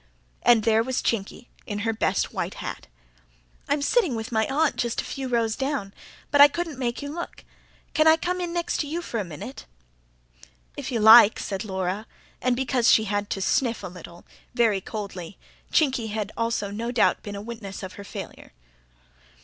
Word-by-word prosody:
and 235 -2 +5
there 225 0 +4
was 255 +2 -1
Chinky, 225 +2 -2 0.2
in 205 - -3
her 225 - +1
best 220 - 0
white - - -3
hat. - - -6 0.8
"I'm 285 0 +1
sitting 350 - +2
with 220 +1 -5
my 220 -1 +1
aunt 300 +3 +1
just 235 -1 -1
a - - -1
few 270 -1 -5
rows 230 -3 +1
down; 265 -8 -3 0.4
but 285 - +6
I 285 - +12
couldn't 325 -1 -4
make 240 +1 -2
you 285 - -5
look. 345 +1 -7 0.5
Can 310 0 +4
I 320 0 +7
come 360 +2 -2
in 350 -1 -3
next 345 0 -2
to 295 - -1
you 335 +4 -3
for 235 - -3
a - - -1
minute?" 145 - -9 1.1
"If - - -5
you 235 - 0
like," 220 0 +9
said 195 +1 -4
Laura 190 +1 -3 0.3
and, 255 -1 +2
because 250 -2 +2
she 220 - +5
had 205 -1 -2
to 195 - -3
sniff 235 +3 +1
a - - -4
little, 175 -1 -12 0.3
very 225 -5 +3
coldly: 200 -4 -7 0.3
Chinky 260 -7 +2
had 210 -1 -3
no 230 0 -2
doubt 245 - +4
also - - -33
been 205 -1 -7
a 200 - -5
witness 220 -4 -7
of 190 - -6
her 200 - -9
failure. 200 - -9
230 Hz, 190 wpm, -25 LUFS, 205-270 Hz, 1.1 s, I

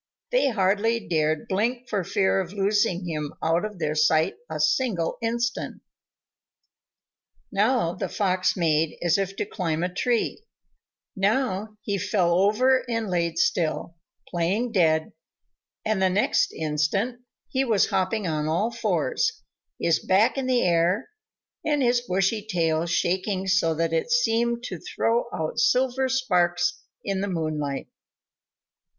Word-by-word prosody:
They - - +3
hardly 215 +1 +1
dared 155 -2 0
blink 240 +6 -1
for 205 -5 -1
fear 195 +1 +1
of 185 0 -7
losing 200 -2 +1
him 150 -3 -4
out 165 +3 +2
of 210 -2 -5
their 155 -3 -1
sight 155 +1 +3 0.2
a 155 -1 -4
single 170 - 0
instant. 235 +1 -2 1.7
Now 210 -3 +2
the - - -4
Fox 185 -3 0
made 160 -2 +1
as 175 +2 +3
if 195 0 -2
to - - -2
climb 170 -5 -2
a 180 0 -2
tree, 240 - 0 0.7
now 210 0 0
he 200 -2 -1
fell 185 -3 +1
over 215 +8 +3
and 230 -4 -2
lay 170 -2 0
still, 170 0 0 0.3
playing 190 +8 -1
dead, 160 -6 +2 0.7
and 215 -3 0
the 190 - +4
next 195 +3 +2
instant 160 +11 -1 0.3
he 265 0 0
was 225 -6 +2
hopping 195 +2 0
on 155 -2 -1
all 185 +9 0
fours, 450 - -1 0.4
his 165 -1 +2
back 195 +4 +3
in 270 -2 -2
the 250 -1 +2
air, 175 - +2 0.5
and 295 -3 +1
his 240 0 +3
bushy 195 0 0
tail 170 -5 0
shaking 185 +3 0
so 180 -4 +2
that 165 +1 -1
it 165 +7 0
seemed 235 0 +1
to 185 -8 -5
throw 230 +7 0
out 160 +7 -3
silver 260 +2 +2
sparks 175 -9 +1 0.2
in 195 -1 -2
the 200 - -1
moonlight. 155 -5 -2
190 Hz, 140 wpm, -25 LUFS, 170-230 Hz, 1.7 s, the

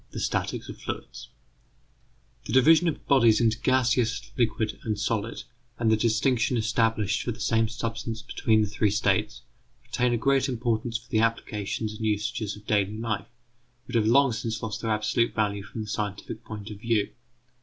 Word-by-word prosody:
THE - - -6
STATICS - - -2
OF - - -8
FLUIDS - - -6 1.2
The - - -4
division 160 +6 +6
of 160 - -2
bodies 120 -6 +5
into 115 -1 +2
gaseous, 120 -3 +1
liquid, 110 -3 0
and 105 -2 -2
solid, 110 0 -2 0.3
and 115 -2 +2
the - - +6
distinction 115 +2 +1
established 110 -2 +1
for 120 - -2
the 115 - -8
same 115 0 +2
substance 115 0 -4
between 110 -1 +2
the - - -1
three 105 +1 +1
states, 65 - 0 0.4
retain 125 0 0
a 120 - +2
great 135 +3 +2
importance 120 -1 -1
for 120 +1 -18
the 110 - +3
applications 110 -1 -1
and 110 +1 -7
usages 110 0 -1
of 105 0 -15
daily 105 0 +1
life, 110 -2 -2 0.6
but 125 - -10
have 110 -2 +3
long 135 +3 +5
since 115 0 -3
lost 110 -1 -4
their 115 - -2
absolute 110 +2 +1
value 100 -2 0
from 110 +2 -7
the - - -9
scientific 105 +1 -4
point 105 -1 -8
of 105 - -8
view. 110 -3 0
110 Hz, 175 wpm, -27 LUFS, 105-120 Hz, 1.2 s, division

